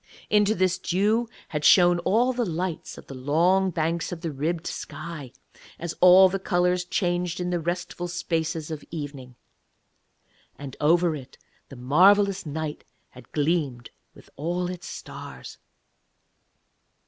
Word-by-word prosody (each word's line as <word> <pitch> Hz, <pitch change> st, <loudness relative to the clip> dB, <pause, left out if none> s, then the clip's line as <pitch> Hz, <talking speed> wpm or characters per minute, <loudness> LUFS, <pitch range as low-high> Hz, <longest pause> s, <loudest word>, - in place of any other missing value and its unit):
Into 210 Hz, 0 st, +4 dB
this 185 Hz, 0 st, +1 dB
dew 210 Hz, +6 st, +1 dB, 0.2 s
had 150 Hz, -1 st, -3 dB
shone 175 Hz, 0 st, +6 dB
all 235 Hz, +8 st, +2 dB
the 245 Hz, 0 st, -1 dB
lights 175 Hz, -3 st, -4 dB
of -, -, -12 dB
the -, -, -10 dB
long 170 Hz, +9 st, +2 dB
banks 165 Hz, 0 st, -1 dB
of 170 Hz, -2 st, -6 dB
the 165 Hz, -2 st, -3 dB
ribbed 160 Hz, +4 st, -2 dB
sky, 155 Hz, -7 st, -7 dB, 0.5 s
as 170 Hz, 0 st, -5 dB
all 185 Hz, +1 st, +8 dB
the 195 Hz, +1 st, -2 dB
colours 180 Hz, -1 st, +1 dB
changed 175 Hz, -1 st, -1 dB
in 180 Hz, 0 st, -2 dB
the 175 Hz, -, 0 dB
restful 175 Hz, +1 st, -3 dB
spaces 165 Hz, -2 st, -2 dB
of 155 Hz, -2 st, -6 dB
evening. 140 Hz, -5 st, -7 dB, 1.2 s
And 140 Hz, -2 st, -8 dB
over 165 Hz, +2 st, +3 dB
it 135 Hz, -3 st, -11 dB, 0.3 s
the 135 Hz, -, -10 dB
marvellous 190 Hz, +9 st, +4 dB
night 150 Hz, 0 st, -4 dB, 0.3 s
had 125 Hz, -1 st, -16 dB
gleamed 145 Hz, -6 st, -1 dB, 0.2 s
with -, -, -17 dB
all 175 Hz, +4 st, -2 dB
its 180 Hz, -1 st, -8 dB
stars. -, -, -9 dB
175 Hz, 135 wpm, -25 LUFS, 155-185 Hz, 1.2 s, all